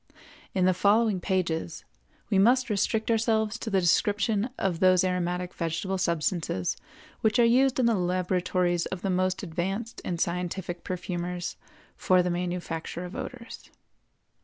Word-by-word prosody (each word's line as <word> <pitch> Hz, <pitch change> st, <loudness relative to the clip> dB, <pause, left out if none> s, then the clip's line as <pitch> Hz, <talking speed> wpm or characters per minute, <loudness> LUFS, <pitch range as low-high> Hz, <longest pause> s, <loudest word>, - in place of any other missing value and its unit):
In 185 Hz, -1 st, +3 dB
the 185 Hz, -, +4 dB
following 205 Hz, +2 st, +3 dB
pages 170 Hz, -3 st, -2 dB, 0.5 s
we 195 Hz, -, +4 dB
must 245 Hz, +3 st, +4 dB
restrict 215 Hz, +3 st, 0 dB
ourselves 220 Hz, -1 st, +1 dB
to 225 Hz, -, -4 dB
the 195 Hz, -2 st, +2 dB
description 205 Hz, +5 st, +2 dB
of 180 Hz, -4 st, -1 dB
those 185 Hz, -1 st, +5 dB
aromatic 180 Hz, -1 st, -1 dB
vegetable 185 Hz, +3 st, -2 dB
substances 170 Hz, -, -1 dB, 0.4 s
which 220 Hz, +1 st, +2 dB
are 240 Hz, -, +6 dB
used 260 Hz, +3 st, +3 dB
in 250 Hz, -, +3 dB
the 235 Hz, -, +4 dB
laboratories 180 Hz, -1 st, 0 dB
of 185 Hz, -, -6 dB
the 195 Hz, -, 0 dB
most 185 Hz, +2 st, 0 dB
advanced 195 Hz, +6 st, -3 dB
and 170 Hz, -2 st, -3 dB
scientific 175 Hz, 0 st, -3 dB
perfumers 180 Hz, -1 st, -4 dB, 0.4 s
for 185 Hz, -1 st, +3 dB
the 180 Hz, -, 0 dB
manufacture 175 Hz, -1 st, -3 dB
of 180 Hz, -, -8 dB
odors. 245 Hz, -3 st, -8 dB
185 Hz, 140 wpm, -27 LUFS, 175-210 Hz, 0.5 s, are